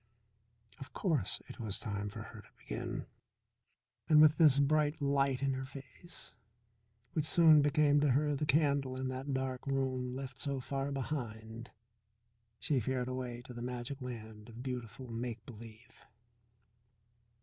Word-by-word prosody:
Of 135 - -10
course 155 - 0
it - - -10
was 110 -4 -2
time 105 -2 -3
for - - -7
her - - -10
to - - -20
begin. - - -5 1.0
And 155 -1 +7
with 155 0 +7
this 150 -5 +6
bright 150 +2 +2
light 140 -2 +1
in 135 -1 +2
her 130 0 -3
face, 140 +6 -11 0.8
which 155 - +1
soon 160 -3 +7
became 145 0 +4
to 145 0 +3
her 145 +2 +2
the 150 +2 -2
candle 140 -3 +2
in 130 0 -2
that 130 +2 -4
dark 130 0 -2
room 130 -2 -1
left 135 -1 -6
so 140 -2 -1
far 135 +2 -3
behind, 115 -4 -4 0.9
she 145 0 +1
fared 125 +2 -1
away 125 -2 -4
to 125 - -10
the 120 - -7
magic 125 +3 -5
land 110 -3 -8
of 115 +2 -9
beautiful 125 -1 -5
make 115 -1 -4
believe. 115 0 -13
130 Hz, 150 wpm, -34 LUFS, 120-140 Hz, 1.0 s, And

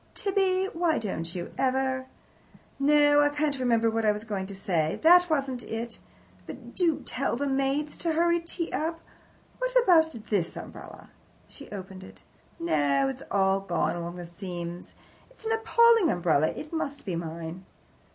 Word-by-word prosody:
Tibby, 385 -1 +1
why 330 -1 +1
don't 170 -5 -4
you 175 -1 -5
ever 260 0 0 0.7
No, 290 +1 +5
I 290 - +4
can't 290 -1 -1
remember 230 -3 +2
what 225 0 0
I 215 - +4
was 210 +1 -4
going 200 -4 -4
to 200 - -7
say. 170 -6 -1
That 355 +2 +7
wasn't 270 -5 -1
it, 225 0 -6 0.5
but 240 0 -10
do 335 -5 +1
tell 255 -2 -1
the 285 +4 -2
maids 275 +2 -1
to 335 -2 0
hurry 340 +1 +3
tea 335 0 -5
up. 330 +1 -2 0.6
What - - -2
about 320 -6 +5 0.2
this 185 -5 0
umbrella?" - - -10 0.4
She 280 - -12
opened 190 -1 -8
it. - - -14 0.4
"No, 140 - +2
it's 135 - -6
all 195 -1 +2
gone 185 -3 -1
along 170 0 -5
the 175 -1 -7
seams. 175 -1 -7 0.3
It's - - -16
an 445 - -1
appalling 450 -3 +4
umbrella. 160 -4 +2
It 305 - -6
must 290 -3 -3
be 185 -4 -2
mine." 165 +2 -6
260 Hz, 160 wpm, -27 LUFS, -, 0.7 s, That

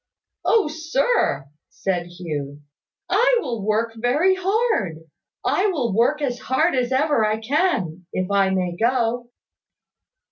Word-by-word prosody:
"Oh, 445 -7 +3
sir," 315 - 0 0.2
said 180 -3 -2
Hugh, 150 -5 -6 0.4
"I - - +3
will 235 - -4
work 220 +2 0
very 270 +11 +2
hard, 385 - 0 0.5
I 390 - +2
will 265 - -1
work 275 +7 +2
as 250 -3 -1
hard 310 +7 +1
as 250 -1 0
ever 280 -2 +2
I 215 0 +1
can, 220 - -1
if 185 +1 -2
I 195 -1 +3
may 180 -2 -1
go." 240 +2 0
240 Hz, 130 wpm, -22 LUFS, 190-310 Hz, 0.5 s, Oh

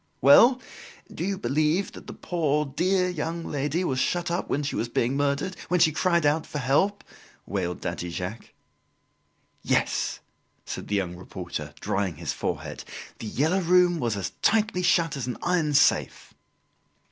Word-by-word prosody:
"Well, 235 - +7 0.5
do - - -4
you 195 +1 -1
believe 155 +7 +1
that - - -12
the - - -7
poor 150 -4 0
dear 180 +7 +1
young 170 -1 -3
lady 145 +5 -1
was 130 -7 -1
shut 175 +5 0
up 175 - -2
when 145 - 0
she 140 - -3
was 115 - -2
being 120 +2 0
murdered 145 +6 0
when 180 - +1
she 155 - +5
cried 170 0 +1
out 150 +2 +2
for - - -5
help?" 150 +10 +1 0.4
wailed 90 -3 -3
Daddy 90 - -4
Jacques. 90 +6 -6 1.1
"Yes," - - 0 0.5
said - - -6
the 105 - -1
young 90 -3 -1
reporter, 85 -4 -7
drying 95 -1 -1
his 80 -2 -4
forehead, - - -4 0.4
""The 110 - -6
Yellow 160 - +1
Room" 180 0 +4
was 115 -6 -1
as 95 - -3
tightly 215 -3 +2
shut 170 -4 +2
as 130 -3 -4
an 125 - -3
iron 165 -5 +1
safe." 145 - +2
150 Hz, 160 wpm, -26 LUFS, 120-180 Hz, 1.1 s, Well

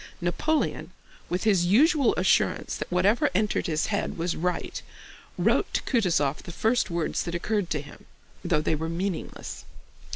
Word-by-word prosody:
Napoleon, 295 - -1 0.4
with 180 +1 -1
his 190 -5 +3
usual 280 - +4
assurance - - +1
that - - -6
whatever 195 +6 +3
entered 210 +2 +1
his 155 -1 0
head 200 - -2
was 170 +1 -1
right, 180 +2 -2 0.6
wrote - - +2
to - - 0
Kutúzov 165 - +1
the - - -9
first 225 +6 +1
words 170 -2 -1
that 170 - -4
occurred 205 +1 -1
to 150 - -1
him, 145 - -14 0.4
though 170 -4 +1
they 155 - 0
were 160 +1 -2
meaningless. 180 +1 -4
180 Hz, 155 wpm, -26 LUFS, 165-215 Hz, 0.6 s, usual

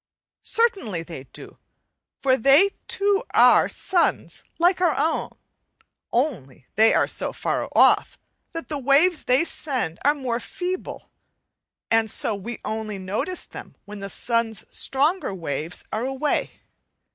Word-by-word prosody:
Certainly 390 - 0
they 160 -5 -9
do, - - -13 0.6
for 260 -2 +4
they 275 - +5 0.2
too 400 +2 +1
are - - +6
suns 355 -2 0
like 355 +2 +3
our 350 -4 +2
own, 320 0 0 0.8
only 225 - -2
they 220 +1 +5
are - - +3
so - - -2
far - - -2
off - - +4 0.3
that 330 0 -6
the 295 -2 -3
waves 285 +6 +3
they 255 +5 +3
send 260 - -3
are 290 +2 +4
more 250 -4 -2
feeble, 365 +7 -5 0.8
and 225 -1 +3
so 220 - -1
we 215 +4 -6
only 215 -1 -4
notice 200 - -3
them - - -11
when 210 0 -9
the 195 0 -6
sun's 230 +1 -2
stronger 285 - 0
waves 160 -1 -5
are 220 - -1
away. 270 +3 -2
255 Hz, 135 wpm, -23 LUFS, 210-330 Hz, 0.8 s, are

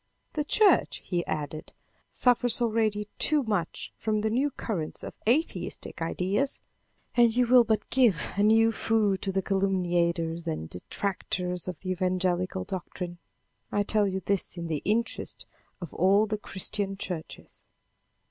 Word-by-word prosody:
"The 300 - 0
church," 410 +7 +3
he 175 -2 -1
added, 155 +1 -4 0.4
"suffers 245 -1 +4
already 215 -3 +1
too 300 -2 +3
much 205 -7 -2
from 215 -1 0
the 220 0 0
new 265 +6 +2
current 195 - -4
of - - -6 0.2
atheistic 300 - -1
ideas, 190 +10 0 0.5
and 235 -2 +4
you 250 0 +4
will 245 0 +7
but 220 -2 0
give 230 - +3
a 200 - +1
new 225 +2 +5
food 215 -4 +1
to 195 - -1
the 190 0 -1
calumniators 175 -4 0
and 155 - -3
detractors 180 - -3
of 180 -4 -6
the 185 - -3
evangelical 185 0 0
doctrine. 180 -2 -6 0.5
I 205 - +1
tell 210 0 +2
you 190 0 -2
this 195 -1 -1
in 170 - -4
the 155 -3 -1
interest 225 +4 -1 0.3
of 175 -4 -8
all 195 +4 +4
the 215 -1 -3
Christian 195 0 -2
churches." 175 -5 -7
195 Hz, 145 wpm, -28 LUFS, 180-225 Hz, 0.5 s, will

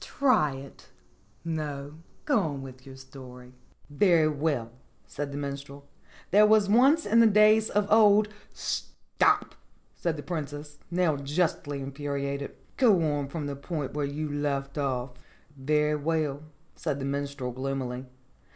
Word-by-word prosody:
Try 220 - +2
it. 135 +1 -12 0.6
No; 150 -2 -4 0.3
go 285 -6 +3
on 145 -7 -3
with 130 -1 -10
the 135 -1 -11
story." 125 -2 -12 0.3
"Very 160 +1 +3
well," 145 -6 -1 0.3
said 145 0 -5
the 140 - -5
Minstrel. 140 0 -6 0.4
"There 210 +2 +6
was 215 -2 +4
once 265 +10 +4
in 225 +3 +4
the 230 - +7
days 215 +1 +5
of 210 0 +1
old 210 -1 +6 0.2
" - - -33
"Stop!" - - -1 0.4
said 165 -3 -2
the 145 - -7
Princess, 145 -1 -6
now 170 -4 +1
justly 145 0 -1
infuriated. 140 0 -4 0.2
"Go 225 -8 +5
on 145 -1 -2
from 150 +1 -5
the 140 -1 -4
point 145 0 -5
where 145 -1 -1
you 150 +2 -3
left 140 -1 -2
off." 135 -3 -2 0.4
"Very 150 +2 +1
well," 150 -2 -1 0.3
said 140 - -2
the 135 - -4
Minstrel 140 -2 -3
gloomily. 130 0 -4
145 Hz, 140 wpm, -28 LUFS, 140-170 Hz, 0.6 s, the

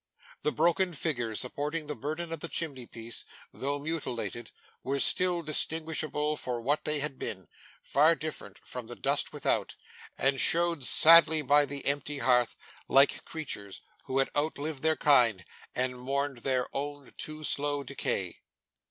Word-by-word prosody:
The 150 - 0
broken 175 +3 +2
figures 120 -8 -1
supporting 150 +5 -3
the 150 - -3
burden 155 +4 -5
of 165 - -5
the 170 - -5
chimney 140 -8 -3
piece, 115 0 -6 0.3
though 140 +2 -3
mutilated, 125 - -4 0.3
were 140 +2 -2
still 180 +1 +2
distinguishable 155 -1 0
for 125 -3 -4
what 140 +6 -1
they 150 -1 +1
had 140 -2 -2
been 95 -4 -5 0.4
far 155 +4 +4
different 155 -11 -7
from 125 -3 -8
the 120 - -8
dust - - +1
without - - -1 0.4
and 135 -1 +2
showed 170 +2 +2
sadly 160 0 +7
by 145 +2 +4
the 140 0 -3
empty 145 +1 0
hearth, 125 -3 +2 0.3
like 135 +1 +4
creatures 105 -11 -6 0.2
who 130 - -2
had 135 - +1
outlived 145 -1 -2
their 160 0 +2
kind, 120 -10 +4 0.3
and 125 0 -1
mourned 135 0 -2
their 130 0 0
own 145 0 -5
too 155 0 -5
slow 145 -1 0
decay. - - -3
145 Hz, 150 wpm, -29 LUFS, 125-155 Hz, 0.4 s, sadly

